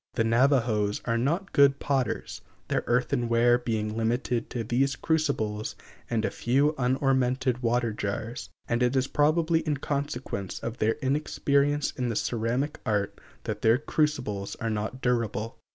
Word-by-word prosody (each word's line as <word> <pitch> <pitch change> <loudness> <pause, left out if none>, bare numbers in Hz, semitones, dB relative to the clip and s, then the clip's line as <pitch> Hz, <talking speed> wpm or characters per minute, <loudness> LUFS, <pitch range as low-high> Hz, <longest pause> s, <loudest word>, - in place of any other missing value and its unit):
The - - +2
Navajos 115 -3 +2
are 115 - +1
not 170 - -1
good 140 -1 +5
potters; 135 -5 -2 0.3
their - - 0
earthenware 120 -1 +2
being 110 -3 -2
limited 115 +1 -1
to 120 - -3
these 130 +4 +1
crucibles 120 -10 -1 0.3
and 110 -2 0
a - - -1
few 140 +5 +2
unornamented 130 0 +1
water 120 -1 +1
jars; 110 +3 -4 0.2
and 120 +1 0
it 125 +2 +2
is 130 -1 +2
probably 160 +4 +2
in 150 -3 -1
consequence 135 -9 -3
of 115 +1 -4
their 110 +1 +3
inexperience 140 +1 +1
in 125 -2 -2
the 115 - -2
ceramic 120 +7 -1
art 105 -5 -1 0.2
that - - -4
their 115 +2 +5
crucibles 130 -9 -1
are 115 -3 -3
not 110 +5 -4
durable. 115 -1 -1
125 Hz, 145 wpm, -27 LUFS, 115-140 Hz, 0.3 s, good